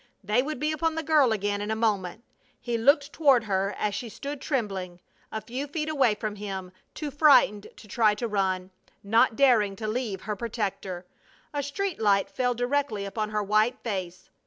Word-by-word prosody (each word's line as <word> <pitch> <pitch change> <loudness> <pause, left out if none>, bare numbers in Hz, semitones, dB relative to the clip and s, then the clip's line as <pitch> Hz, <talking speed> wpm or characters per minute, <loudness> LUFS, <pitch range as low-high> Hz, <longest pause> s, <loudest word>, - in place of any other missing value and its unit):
They 210 +5 +2
would 295 0 -4
be 305 +2 0
upon 320 +1 0
the 320 - -2
girl 295 -5 +4
again 205 -1 -1
in 205 - -4
a 220 - 0
moment. 215 -2 -1 0.4
He 240 -1 -3
looked 280 +5 +3
toward 275 -7 +4
her, 195 -1 -1
as 210 - -1
she 235 +3 -4
stood 280 +5 -7
trembling 195 - -3 0.3
a 220 - -4
few 255 +7 -5
feet 305 +1 -3
away 265 -8 +3
from 210 -1 -4
him, 190 -3 -6 0.2
too 300 -2 -4
frightened 275 -8 +5
to - - -14
try 210 0 +3
to 235 +3 -3
run, 190 -3 -1 0.3
not 225 +2 +3
daring 225 -7 +4
to 215 +1 -5
leave 215 -3 -2
her 210 -1 -3
protector. 200 -5 -4 0.5
A 290 - -1
street 330 - -3
light 200 -2 +2
fell 250 -1 0
directly 245 -4 -1
upon 215 +2 -3
her 210 -1 -1
white 215 +5 +2
face. 185 -5 -5
220 Hz, 185 wpm, -27 LUFS, 205-275 Hz, 0.5 s, frightened